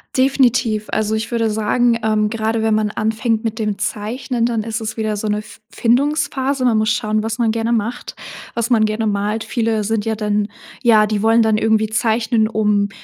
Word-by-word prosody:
Definitiv. 250 -5 +2
Also, 215 0 0
ich 220 +2 -4
würde 230 -1 +1
sagen, 230 +3 +1
ähm, 215 -1 +1
gerade 225 0 -1
wenn 220 -1 +2
man 215 -1 0
anfängt 220 +1 -1
mit 225 -1 -3
dem 210 -3 -2
Zeichnen, 230 +4 -2
dann 235 -2 0
ist 220 +1 -4
es 220 -1 -5
wieder 215 -2 -2
so 215 - -3
'ne 210 0 0
F 215 - -12
Findungsphase. 270 +1 0
Man 235 -3 +3
muss 215 +1 +2
schauen, 215 -1 0
was 225 +2 -3
man 230 -2 +2
gerne 225 +1 -1
macht, 230 +2 -3 0.4
was 235 0 -2
man 225 -3 +4
gerne 215 +1 -1
malt. 210 +2 -1
Viele 225 -3 -1
sind 210 0 -1
ja 225 - 0
dann 210 -1 -1 0.3
ja, 215 -3 +5
die 210 -1 -1
wollen 225 +1 +4
dann 220 -1 +2
irgendwie 220 0 +2
zeichnen, 225 0 +1
um 210 -2 +1
220 Hz, 200 wpm, -18 LUFS, 215-230 Hz, 0.4 s, ja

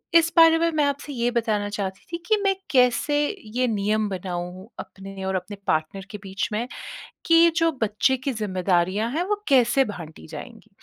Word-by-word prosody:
इस 335 0 +6
बारे 325 0 +8
में 335 0 +2
मैं 300 - +3
आपसे 285 +1 -3
ये 240 -1 0
बताना 220 -4 0
चाहती 195 -2 -5
थी 340 - -2
कि 435 -1 +4
मैं 395 -1 +3 0.2
कैसे 250 +2 +3 0.4
ये 255 0 +2
नियम 215 0 0
बनाऊँ 180 0 -5
अपने 195 0 -8
और 190 0 -1
अपने 185 +3 -4
पार्टनर 155 +5 -1
के 210 - -6
बीच 195 +1 -3
में 220 +3 -2 0.6
कि 330 0 +6
जो 330 0 +3
बच्चे 220 +5 +2
की 260 +2 -3
ज़िम्मेदारियाँ 190 0 0
हैं 320 +6 0
वो 420 - +3
कैसे 265 0 +4
बाँटी 160 - -9
जाएँगी? - - -10
215 Hz, 175 wpm, -24 LUFS, 190-275 Hz, 0.6 s, बारे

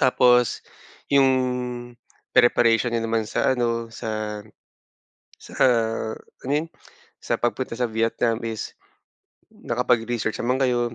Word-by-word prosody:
Tapos, 125 -2 +4 0.5
yung 140 -1 +5 1.1
preparation 120 0 +4
niyo 115 - 0
naman 115 -1 0
sa 130 - +1
ano, 115 -1 -1
sa 110 -2 -4 1.0
sa - - -14 0.6
-ano 135 - -8
yun, 155 +3 0 0.5
sa - - -1
pagpunta 120 0 -2
sa 120 0 -1
Vietnam 115 +1 0
is 110 -1 -5 0.8
nakapag 120 -1 0
research 115 -2 -2
naman 125 +2 0
kayo. 125 -2 +2
120 Hz, 110 wpm, -23 LUFS, 115-125 Hz, 1.1 s, yung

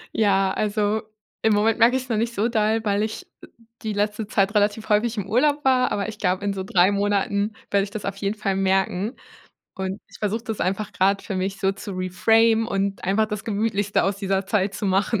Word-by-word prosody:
Ja, 195 -3 +3
also, 210 0 0 0.4
im 220 - +3
Moment 220 +2 +2
merke 235 +3 +5
ich 260 - -1
es 255 - -16
noch 225 - 0
nicht 230 +2 -1
so 210 +3 +1
doll, 220 -1 +1
weil 205 0 +1
ich 215 0 -4 0.2
e - - -12 0.3
die 220 -2 -3
letzte 210 +1 -1
Zeit 200 -1 +1
relativ 210 +1 +1
häufig 220 +2 +2
im 200 -2 -3
Urlaub 285 +7 +2
war, 255 -1 +3
aber 200 0 -1
ich 215 -1 -8
glaube, 185 0 0
in 200 - 0
so 190 -1 -4
3 185 0 +3
Monaten 205 +1 0 0.2
werde 200 -1 +3
ich 200 - -5
das 205 0 -6
auf 195 - -3
jeden 200 +1 -2
Fall 200 -2 -1
merken 195 +3 0 0.6
und 190 +1 -4
ich - - -15
versuche 220 +2 -2
das 220 -3 -4
einfach 200 +3 -1
grad 195 0 +2
für 195 - -5
mich 190 +1 -2
so 195 -2 +1
zu 195 +1 -8
reframen 225 +5 +2
und 195 -2 -2
einfach 200 +4 +2
das 210 -2 -5
gemütlichste 205 -1 0
aus 195 0 0
dieser 195 -1 -1
Zeit 200 -1 0
zu 205 - -5
machen. 195 +3 +1
205 Hz, 220 wpm, -23 LUFS, 195-220 Hz, 0.6 s, merke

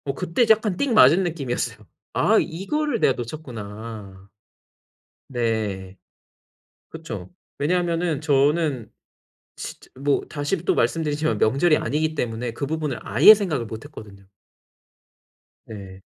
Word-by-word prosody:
어 140 - -2
그때 180 - +1
약간 215 -4 +3
띡 280 -4 0
맞은 175 - +6
느낌이었어요. 145 -8 -3 0.4
'아 - - +3
이거를 235 - -2
내가 135 - +4
놓쳤구나.' 110 -7 -8 1.0
네. 110 -6 -2 0.9
그쵸. 115 - -8 0.3
왜냐하면은 170 -1 0
저는 145 - +1 0.7
진짜 - - -9
뭐 140 0 +1
다시 145 +5 -2
또 - - +2
말씀드리지만 155 +4 0
명절이 145 +8 +3
아니기 155 +2 -1
때문에 120 -3 -3
그 140 +5 -4
부분을 150 -3 -3
아예 140 - +8
생각을 165 - -2
못 110 0 -8
했거든요. 105 -9 -12 1.4
네. 95 -3 -10
145 Hz, 260 characters per minute, -23 LUFS, 115-165 Hz, 1.4 s, 아예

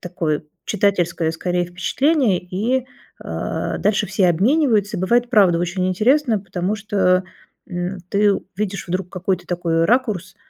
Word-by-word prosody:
такое 165 -4 -2 0.2
читательское, 175 -5 +1
скорее, 175 +2 -1
впечатление, 205 - +1
и, 210 +9 -1 0.4
э, - - -3
дальше 210 0 +1
все 190 0 +2
обмениваются. 210 - +2
И - - -4
бывает 240 +6 +2
правда 190 -7 +4
очень 175 +2 -1
интересно, 230 +5 +2
потому 190 +1 -3
что, 195 -3 +1 0.4
м, 180 +1 -4
ты 205 0 +3 0.2
видишь 200 -2 -3
вдруг 185 +1 -2
какой-то 185 -1 -2
такой 170 -2 0
ракурс, 215 -7 0
190 Hz, 130 wpm, -20 LUFS, 175-215 Hz, 0.4 s, правда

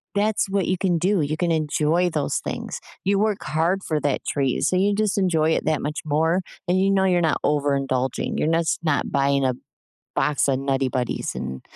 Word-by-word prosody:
that's 205 -1 +1
what 195 -1 0
you 185 - +1
can 180 -3 +1
do, 185 +1 +1
you 150 +2 -1
can 175 -2 0
enjoy 160 +3 +1
those 150 -3 -1
things. - - -5 0.2
You 195 +1 +2
work 210 -1 0
hard 170 +5 0
for 155 -2 -1
that 145 -2 0
treat, 135 -3 0
so 185 - +2
you 200 +2 +2
just 210 -1 0
enjoy 160 -4 +2
it - - 0
that 155 -2 +1
much 150 +1 -3
more, 160 +5 +1 0.3
and 185 +1 +2
you 195 +1 +3
know 190 -1 +3
you're 180 -2 +3
not 160 - +1
overindulging. 135 -3 0
You're - - +1
nos 165 0 +1
not 155 -3 0
buying 140 -1 +2
a 130 - +2 0.6
box 145 0 +1
of 135 -1 +1
Nutty 135 -1 0
Buddys 125 -1 -2
and 65 0 -5
160 Hz, 205 wpm, -23 LUFS, 140-185 Hz, 0.6 s, you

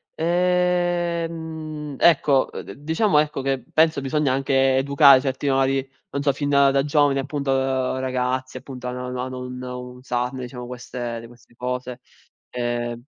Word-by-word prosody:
Ehm, 170 -3 -1
ecco, 140 -5 +4
uhm, - - -6
d - - -9
diciamo, 160 +4 +2
ecco, 150 -2 -1
che 135 -2 -1
penso 160 -2 +3
bisogna 140 0 +1
anche 135 0 +2
educare 140 0 +6
certi 135 +1 -2
valori, 135 0 +1 0.2
non 140 - -3
so 140 -1 +3
fin 145 +1 -2
da 140 -1 +4
giovani, 145 -1 +2
appunto 140 0 -2 0.5
ragazzi 130 0 -2
appunto, 130 -1 -8
ano 125 0 -4
ano 125 0 -4
ano 130 0 -5
un 125 0 -7 0.4
usarne, 125 0 -3
diciamo, 125 0 -8
queste 120 -1 -5
di 115 - -11
queste 120 0 -20
cose, 125 0 -4 0.5
ehm. 120 -1 -3
135 Hz, 145 wpm, -23 LUFS, 125-150 Hz, 0.5 s, educare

